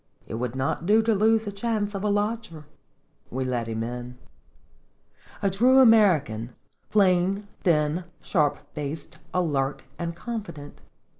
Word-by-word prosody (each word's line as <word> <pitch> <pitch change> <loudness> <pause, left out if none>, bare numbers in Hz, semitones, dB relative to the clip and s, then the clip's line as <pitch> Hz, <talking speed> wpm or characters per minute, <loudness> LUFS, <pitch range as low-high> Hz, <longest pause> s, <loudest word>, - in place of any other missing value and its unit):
It - - -7
would 120 +2 -3
not 135 +5 -2
do 220 +2 +5
to 225 0 +2
lose 220 +2 +3
a 205 - -3
chance 210 0 -2
of 195 0 -4
a 210 - +1
lodger. 205 -6 -2 0.6
We 130 +2 -2
let 125 -3 -2
him 115 0 -2
in. 125 +1 -6 1.3
A 200 - +3
true 245 +7 +4
American, 165 - +4 0.3
plain, 195 0 +2 0.2
thin, 160 0 +2
sharp 150 -5 +1 0.2
faced, 150 +1 -6
alert, 145 -6 0 0.2
and 170 -1 -3
confident. 200 -9 -7
175 Hz, 135 wpm, -26 LUFS, 135-210 Hz, 1.3 s, do